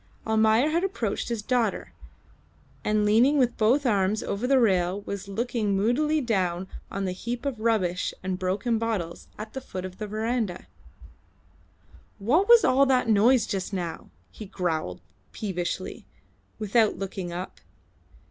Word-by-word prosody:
Almayer 220 +5 +3
had 335 +3 +1
approached 245 - -2
his 230 -3 -3
daughter, 235 -3 -1 0.9
and 210 0 +1
leaning 235 +8 +4
with 245 -3 +2
both 250 +6 +2
arms 205 -2 +1
over 205 +5 -2
the 270 0 +4
rail, 190 -3 +2
was 200 0 -6
looking 215 -1 -1
moodily 295 +10 +2
down 190 -6 -1 0.2
on 195 0 -3
the 185 - -1
heap 235 +7 -5
of 270 -5 -2
rubbish 205 -6 0
and 185 -1 -2
broken 205 +5 0
bottles 205 -7 -3
at 215 +1 -8
the 265 - -5
foot 185 -7 -6
of 185 0 -9
the 215 - -4
verandah. 215 -3 -2 1.5
"What 295 - +2
was 475 -2 +8
all 275 +2 +4
that 255 -3 +2
noise 225 +3 +5
just 195 0 -3
now?" 175 -3 -4 0.2
he 215 - -9
growled 160 - -3 0.3
peevishly, 185 -2 -4 0.5
without 215 +1 +2
looking 190 -2 -5
up. 180 +2 -7
215 Hz, 145 wpm, -26 LUFS, 190-245 Hz, 1.5 s, was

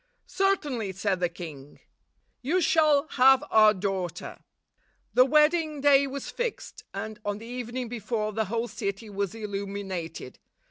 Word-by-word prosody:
"Certainly," 295 - 0
said 195 0 -1
the 175 -1 +1
king, 155 -5 -10 0.6
"you 315 +9 +1
shall 310 -4 +3
have 265 +1 +5
our 215 -1 +7
daughter." 190 -3 -4 0.7
The 255 - +6
wedding 305 +2 +3
day 280 0 +5
was 275 0 -6
fixed, 485 -2 -5
and, 215 -1 -6
on 205 0 -2
the 220 - -10
evening 245 +1 -5
before, 220 -2 -3
the 220 +1 0
whole 230 +4 -2
city 200 0 -5
was 200 0 -3
illuminated. 195 - -5
225 Hz, 135 wpm, -27 LUFS, 200-280 Hz, 0.7 s, our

